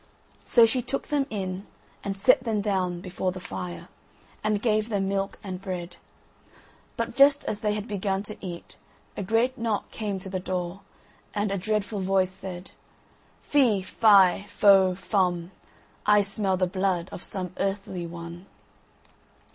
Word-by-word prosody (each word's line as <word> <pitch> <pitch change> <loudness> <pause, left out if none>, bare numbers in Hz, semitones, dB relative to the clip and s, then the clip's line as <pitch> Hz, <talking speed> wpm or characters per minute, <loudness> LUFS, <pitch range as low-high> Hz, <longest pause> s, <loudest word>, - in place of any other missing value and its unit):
So 235 -2 +6
she 250 +3 +2
took 260 +3 -3
them 285 -2 +1
in, 190 -2 -4 0.4
and 195 -1 -3
set 250 +5 +4
them 225 -3 0
down 185 -4 -1
before 185 0 -2
the 185 - -7
fire, 90 - -6 0.6
and 215 -1 +1
gave 215 0 +1
them 200 -3 0
milk 195 0 -2
and 185 -2 -6
bread; 180 -2 -5 1.0
but 230 0 -3
just 280 +1 +5
as 205 - -2
they 210 -1 0
had 210 +1 -4
begun 195 -2 -1
to 210 0 -3
eat 175 -2 -7 0.4
a - - -4
great 230 +6 +1
knock 225 -3 -2
came 210 -3 -3
to 190 - -5
the 190 -1 -3
door, 180 +1 -3 0.5
and 205 -1 0
a 200 - 0
dreadful 210 +1 -1
voice 190 -1 +2
said: 185 -1 -7 0.7
"Fee, 240 -10 +3
fie, 200 -2 +5
fo, 195 -3 +5
fum, 180 -3 0 0.6
I 210 0 +6
smell 200 -1 0
the 185 - +2
blood 185 -1 -1
of - - -7
some 185 -3 -3
earthly 195 -3 -2
one. 170 +2 -9
195 Hz, 155 wpm, -26 LUFS, 185-215 Hz, 1.0 s, So